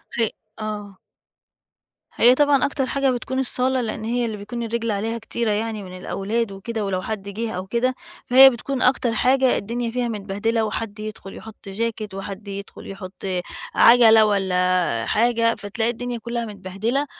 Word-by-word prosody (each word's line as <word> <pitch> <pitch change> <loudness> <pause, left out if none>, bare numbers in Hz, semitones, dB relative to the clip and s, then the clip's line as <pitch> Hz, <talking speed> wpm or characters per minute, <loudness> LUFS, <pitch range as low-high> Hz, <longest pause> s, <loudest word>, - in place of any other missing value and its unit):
ه 230 -2 +1 0.3
آه. 205 -2 -5 1.2
هي 245 +2 +6
طبعًا 290 -1 +4
أكتر 280 -2 -1
حاجة 275 +1 +1
بتكون 255 +1 -3
الصالة 260 0 +1
لإن 220 -2 -4
هي 240 +2 0
اللي 220 -2 -4
بيكون 225 +4 -5
الرِجل 230 0 -2
عليها 220 +3 -2
كتيرة 230 0 -2
يعني 215 0 -2
من 185 -1 -9
الأولاد 205 +4 -2
وكده 210 +2 -4
ولو 185 -2 -1
حد 200 0 -5
جِه 220 +3 -3
أو 185 -1 -5
كده، 240 +4 0 0.3
فهي 265 +2 +9
بتكون 260 +2 -4
أكتر 250 -2 +2
حاجة 260 +2 +3
الدنيا 235 +3 -3
فيها 245 0 -1
متبهدلة 220 +1 -1
وحد 215 0 -4
يدخُل 215 -2 -7
يحُط 220 -2 -11
jacket 215 0 -3
وحد 195 +1 -7
يدخُل 200 0 -8
يحُط 195 -1 -8
آآ 185 -2 -1 0.3
عَجلة 225 -2 +7
والّا 180 - +1
حاجة، 230 0 +2
فتلاقي 220 +3 -2
الدنيا 245 +1 -4
كُلّها 235 +1 -4
متبهدلة 210 +7 -2
225 Hz, 160 wpm, -22 LUFS, 200-240 Hz, 1.2 s, فهي